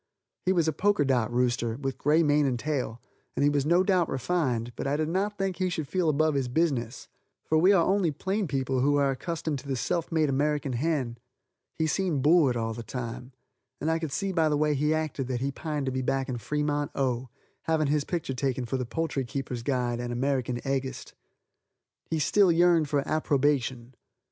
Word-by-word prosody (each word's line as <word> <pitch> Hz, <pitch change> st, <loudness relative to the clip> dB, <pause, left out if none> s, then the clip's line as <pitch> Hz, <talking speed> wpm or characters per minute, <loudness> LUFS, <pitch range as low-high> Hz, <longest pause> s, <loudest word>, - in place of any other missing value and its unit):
He -, -, +5 dB
was 170 Hz, -4 st, +2 dB
a 160 Hz, -, +1 dB
poker 190 Hz, -2 st, +2 dB
dot 125 Hz, -4 st, +1 dB
rooster, 120 Hz, -2 st, 0 dB
with 135 Hz, -2 st, -4 dB
gray 155 Hz, +3 st, +3 dB
mane 145 Hz, -1 st, +3 dB
and 125 Hz, -2 st, 0 dB
tail, 130 Hz, -4 st, -3 dB, 0.4 s
and -, -, +1 dB
he 145 Hz, -, +4 dB
was 145 Hz, 0 st, 0 dB
no 175 Hz, +3 st, +4 dB
doubt 185 Hz, -4 st, +2 dB
refined, 130 Hz, -4 st, -1 dB
but -, -, -4 dB
I 140 Hz, +1 st, +1 dB
did 155 Hz, 0 st, -1 dB
not 200 Hz, +4 st, -1 dB
think 195 Hz, -2 st, -2 dB
he 185 Hz, -1 st, 0 dB
should 160 Hz, -4 st, -3 dB
feel 180 Hz, -1 st, +1 dB
above 155 Hz, +1 st, +2 dB
his 135 Hz, -3 st, 0 dB
business, 125 Hz, -4 st, -1 dB, 0.4 s
for 155 Hz, -, +2 dB
we 185 Hz, +5 st, +5 dB
are 175 Hz, -4 st, +4 dB
only 195 Hz, -3 st, +2 dB
plain 190 Hz, +6 st, -2 dB
people 135 Hz, -2 st, -1 dB
who 145 Hz, +3 st, +3 dB
are 140 Hz, -1 st, +3 dB
accustomed 155 Hz, +1 st, -3 dB
to 140 Hz, -, -12 dB
the 135 Hz, -, -1 dB
self 165 Hz, +7 st, -2 dB
made 160 Hz, -2 st, +2 dB
American 145 Hz, 0 st, 0 dB
hen. 130 Hz, -3 st, -1 dB, 0.6 s
He 160 Hz, -, +1 dB
seemed 160 Hz, -4 st, 0 dB
bored 150 Hz, -5 st, +4 dB
all 115 Hz, -1 st, -2 dB
the 115 Hz, -, -6 dB
time, 125 Hz, +2 st, -6 dB, 0.5 s
and 160 Hz, -, 0 dB
I 165 Hz, -, +1 dB
could 160 Hz, -3 st, -4 dB
see 195 Hz, +7 st, -1 dB
by 165 Hz, -4 st, +2 dB
the 150 Hz, -, +1 dB
way 150 Hz, 0 st, +2 dB
he 150 Hz, +2 st, +1 dB
acted 155 Hz, -4 st, -1 dB
that 125 Hz, -2 st, -2 dB
he 140 Hz, +1 st, 0 dB
pined 150 Hz, 0 st, -3 dB
to 130 Hz, -, -1 dB
be 130 Hz, 0 st, -2 dB
back 135 Hz, +1 st, -1 dB
in 125 Hz, -3 st, -3 dB
Fremont, 145 Hz, +3 st, -1 dB
O., 130 Hz, -2 st, -1 dB, 0.4 s
having 160 Hz, -1 st, +2 dB
his 145 Hz, 0 st, +1 dB
picture 165 Hz, -4 st, -3 dB
taken 130 Hz, -1 st, -1 dB
for 125 Hz, +3 st, -2 dB
the 125 Hz, -2 st, -3 dB
Poultry 150 Hz, 0 st, -2 dB
Keepers' 130 Hz, -1 st, -4 dB
Guide 120 Hz, -2 st, -1 dB
and 120 Hz, 0 st, -4 dB
American 125 Hz, -1 st, -1 dB
Eggist. 135 Hz, -1 st, -3 dB, 1.0 s
He 160 Hz, -, 0 dB
still 185 Hz, +5 st, +4 dB
yearned 170 Hz, -2 st, +4 dB
for 140 Hz, -1 st, 0 dB
approbation. 135 Hz, -5 st, 0 dB
145 Hz, 205 wpm, -27 LUFS, 130-160 Hz, 1.0 s, He